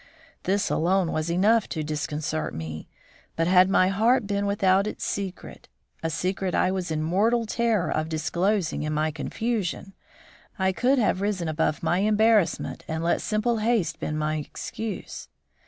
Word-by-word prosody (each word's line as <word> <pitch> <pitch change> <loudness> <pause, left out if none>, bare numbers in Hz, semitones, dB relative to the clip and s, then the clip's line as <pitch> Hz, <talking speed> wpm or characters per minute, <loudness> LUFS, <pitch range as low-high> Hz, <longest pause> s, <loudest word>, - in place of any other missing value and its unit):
This 200 +2 +1
alone 180 +1 +2
was 155 +1 -2
enough 205 +6 +3
to 155 - -3
disconcert 150 - -3
me, 80 -1 -6 0.5
but 165 - +1
had 185 +1 +5
my 185 -1 +4
heart 220 +5 +2
been 200 0 -1
without 195 0 +2
its - - -5
secret 195 -3 -5 0.3
a 165 - -1
secret 185 +3 -2
I 185 - +2
was 185 -2 -3
in 155 -1 -1
mortal 220 +8 +2
terror 225 -4 0
of 155 +1 -1
disclosing 175 +4 0
in 150 0 -2
my 155 +1 0
confusion 195 +5 -3 0.6
I 190 0 +2
could 250 +8 +2
have 205 -5 +1
risen 200 -4 -1
above 155 -1 -1
my 175 - +2
embarrassment 215 -1 +2
and 160 +1 -3
let 170 - +1
simple 225 +2 0
haste 210 -8 0
been 155 - -3
my 155 0 -1
excuse. 210 +8 -6
185 Hz, 155 wpm, -25 LUFS, 160-210 Hz, 0.6 s, had